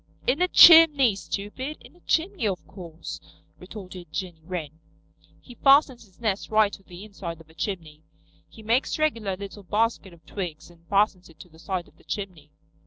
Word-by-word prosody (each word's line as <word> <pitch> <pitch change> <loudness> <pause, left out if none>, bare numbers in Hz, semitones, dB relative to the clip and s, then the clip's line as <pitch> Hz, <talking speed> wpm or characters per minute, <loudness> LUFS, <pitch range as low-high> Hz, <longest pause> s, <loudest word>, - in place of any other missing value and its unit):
"In 270 +7 +1
a 360 - +4
chimney, 305 - +8
stupid. 205 - -6
In - - -17
a - - -22
chimney, 345 - 0
of 190 -3 -3
course," 170 -4 -9 0.4
retorted 180 -3 -10
Jenny 175 -4 -5
Wren. 160 -3 -6 0.6
"He 245 - -14
fastens 275 -2 +3
his 185 - -28
nest 210 -4 -2
right 215 -1 +3
to - - -10
the 185 +1 -12
inside 175 -5 -8
of 160 -1 -17
a - - -20
chimney. 165 -5 -5 0.5
He 220 - -15
makes 235 +5 0
a 310 - 0
regular 220 -11 -1
little 200 +1 -9
basket 210 0 -1
of 165 -2 -19
twigs 175 -3 -7
and 170 -1 -23
fastens 200 -3 +1
it 165 - -19
to 180 - -14
the 160 0 -19
side 175 +2 -4
of - - -24
the - - -23
chimney." 180 -8 -6
195 Hz, 185 wpm, -25 LUFS, 170-230 Hz, 0.6 s, chimney